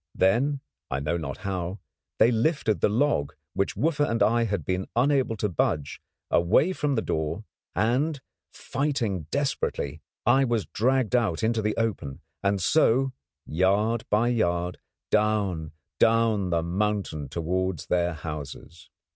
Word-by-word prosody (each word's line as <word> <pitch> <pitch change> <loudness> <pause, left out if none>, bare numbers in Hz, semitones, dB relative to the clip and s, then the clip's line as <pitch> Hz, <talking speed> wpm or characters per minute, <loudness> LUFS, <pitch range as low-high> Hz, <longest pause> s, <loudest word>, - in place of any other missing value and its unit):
Then, 135 +9 +2 0.3
I 65 - -1
know 75 +4 -1
not 75 -5 -4
how, 95 -1 -2 0.4
they 115 - +5
lifted 120 -2 +1
the - - +4
log, 110 - +1 0.2
which 100 - -1
Wooffa 150 -2 +1
and 115 - +2
I 115 +1 +3
had 100 -8 -2
been 95 +1 -1
unable 130 -2 +2
to 105 - 0
budge, 75 -5 -1 0.3
away 100 - +3
from 145 -5 0
the 110 - 0
door, 80 -1 -2 0.3
and, 130 - +1 0.3
fighting 120 - -2
desperately, 110 - -2 0.2
I 130 +4 +5
was 120 -5 0
dragged 125 0 +1
out 110 -7 +1
into 110 0 +1
the 105 0 -1
open, 100 -12 -2 0.2
and 100 0 +1
so, 130 - +3 0.3
yard 100 +7 +1
by 110 +3 +3
yard, 90 -6 0 0.3
down, 100 -7 +1 0.3
down 115 -4 +3
the 85 -1 +1
mountain 90 -5 -1
towards 85 +1 -2
their 85 -1 +1
houses. 75 +1 -8
105 Hz, 140 wpm, -26 LUFS, 85-120 Hz, 0.4 s, they